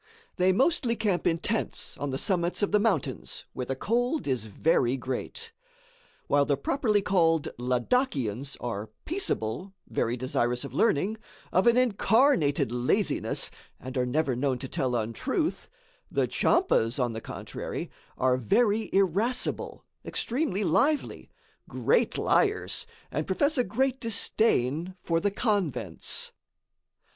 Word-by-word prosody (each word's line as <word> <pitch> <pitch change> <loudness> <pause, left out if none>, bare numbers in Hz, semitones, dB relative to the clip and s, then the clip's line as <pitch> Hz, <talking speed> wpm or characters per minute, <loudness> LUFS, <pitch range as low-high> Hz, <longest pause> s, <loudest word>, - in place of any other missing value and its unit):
They 185 0 +4
mostly 250 - +2
camp 205 -5 0
in 165 - +2
tents 220 +6 -2
on 145 - -2
the 135 - -2
summits 175 +4 0
of 205 - +1
the 210 - +4
mountains, 200 - -1
where 125 - -4
the 135 - -1
cold 245 - 0
is 125 -5 -1
very 125 +3 +1
great. 295 - -5 0.7
While 145 0 +3
the 140 -1 +1
properly 210 - +1
called 165 -5 +2
Ladakians 130 - 0
are 110 -3 -4 0.2
peaceable, 190 - -2
very 120 +2 -1
desirous 125 0 -1
of - - -8
learning, 215 +1 +2 0.3
of 185 +5 +3
an 235 +1 +5
incarnated 225 - +3
laziness, 125 +1 +1 0.3
and 130 +1 -8
are 125 -1 +1
never 140 0 +1
known 130 0 0
to 130 - -6
tell 125 -1 -1
untruth; 115 -1 -2 0.4
the - - +1
Tchampas, 115 +2 +2
on 125 -3 0
the 110 - -5
contrary, - - -6 0.3
are 130 0 +2
very 210 - +2
irascible, 195 +6 0 0.2
extremely 230 - -1
lively, 275 - +1 0.4
great 485 - +1
liars 425 +2 +1 0.2
and - - -2
profess 290 +2 +1
a 250 - +3
great 260 +2 0
disdain 185 - +1
for 165 -1 +1
the 205 - +1
convents. 200 - -2
175 Hz, 130 wpm, -28 LUFS, -, 0.7 s, an